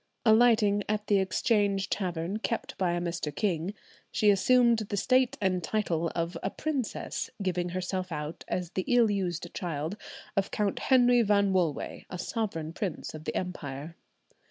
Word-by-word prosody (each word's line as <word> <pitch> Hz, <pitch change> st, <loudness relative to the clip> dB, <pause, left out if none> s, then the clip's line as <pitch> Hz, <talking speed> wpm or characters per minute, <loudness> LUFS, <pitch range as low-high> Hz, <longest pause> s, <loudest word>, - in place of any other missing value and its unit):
Alighting 220 Hz, -3 st, +5 dB
at 215 Hz, 0 st, 0 dB
the 205 Hz, -1 st, +3 dB
Exchange 195 Hz, +1 st, +1 dB
Tavern, 180 Hz, +1 st, -2 dB
kept 230 Hz, +1 st, -3 dB
by 180 Hz, -2 st, +2 dB
a 175 Hz, -, 0 dB
Mr. 170 Hz, -3 st, -2 dB
King, 185 Hz, +1 st, -1 dB, 0.4 s
she 210 Hz, -1 st, +4 dB
assumed 235 Hz, +3 st, +4 dB
the 205 Hz, -1 st, -3 dB
state 255 Hz, +4 st, +3 dB
and 185 Hz, -3 st, 0 dB
title 170 Hz, -4 st, 0 dB
of 170 Hz, +1 st, -2 dB
a -, -, -1 dB
princess, 280 Hz, -1 st, -3 dB
giving 180 Hz, -2 st, -1 dB
herself 185 Hz, 0 st, -3 dB
out 150 Hz, 0 st, -5 dB
as 180 Hz, -2 st, -2 dB
the 185 Hz, -, -2 dB
ill 240 Hz, -3 st, +4 dB
used 175 Hz, -4 st, -2 dB
child 160 Hz, 0 st, -3 dB, 0.4 s
of 195 Hz, -1 st, +1 dB
Count 205 Hz, -2 st, -1 dB
Henry 245 Hz, -2 st, +5 dB
Van 200 Hz, -2 st, +3 dB
Wolway, 170 Hz, -6 st, -1 dB
a 180 Hz, -, -5 dB
sovereign 175 Hz, -5 st, -3 dB
prince 185 Hz, -4 st, -4 dB
of 155 Hz, 0 st, -9 dB
the -, -, -3 dB
empire. 155 Hz, -3 st, -5 dB
190 Hz, 155 wpm, -29 LUFS, 175-215 Hz, 0.4 s, Alighting